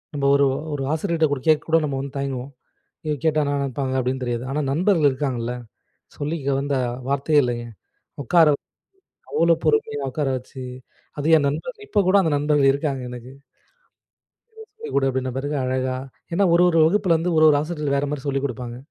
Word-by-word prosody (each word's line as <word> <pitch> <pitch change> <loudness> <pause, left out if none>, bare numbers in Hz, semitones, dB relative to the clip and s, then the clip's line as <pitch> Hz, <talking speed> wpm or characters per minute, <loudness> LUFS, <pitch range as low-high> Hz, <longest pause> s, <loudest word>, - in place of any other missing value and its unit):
நம்ம 140 -1 -1
ஒரு 140 0 +4 0.3
ஒரு 135 - -3
ஆசிரியர்கிட்ட 160 -4 0
கேட்க 155 -1 +4
கூட 165 - +5
நம்ம 135 -2 -3
வந்து 140 0 -7
தயங்குவோம். 135 -1 -4 0.5
எதுவும் 150 -2 -2
கேட்டா 155 -1 +3
என்னா 145 0 -1
நினைப்பாங்க? 135 0 -2
அப்பிடின்னு 130 +1 -2
தெரியாது. 120 0 -2
ஆனா, 150 - -1
நண்பர்கள் 165 -2 +3
இருக்காங்கல்ல, 130 -3 -2 0.6
சொல்லிக்க 145 -1 -3
வந்த 140 0 -1 0.3
வார்த்தையே 140 +2 +3
இல்லேங்க. 120 -1 -3 0.6
உக்கார 165 +4 +5
வச்சு - - -21 0.7
அவ்ளோ 170 0 +4
பொறுமையா 440 0 +1
உட்கார 150 -3 -1
வச்சு 130 +1 -11 0.6
அது 145 - -2
என் 145 -2 +2
நண்பர். 450 - -4
இப்போ 210 - -1
கூட 195 - +5
அந்த 160 - +1
நண்பர்கள் 145 -1 +3
இருக்காங்க 140 -1 -2
எனக்கு. 125 +1 -9 1.5
சொல்லி 450 +1 -8
கொடு 135 -1 +3
அப்பிடின 130 -1 -2
பிறகு 145 +2 -3
அழகா 130 0 -1 0.4
ஏன்னா, 195 +3 +3
ஒரு 175 - +5
ஒரு 165 - +2
வகுப்பில 185 -2 +2
வந்து 175 0 -1
ஒரு 155 - +6
ஒரு 145 - +3
ஆசிரியர்கள் 150 -3 -2
வேறமாரி 145 0 -2
சொல்லிக்கொடுப்பாங்க. 125 -4 -3
145 Hz, 165 wpm, -22 LUFS, 130-160 Hz, 1.5 s, ஒரு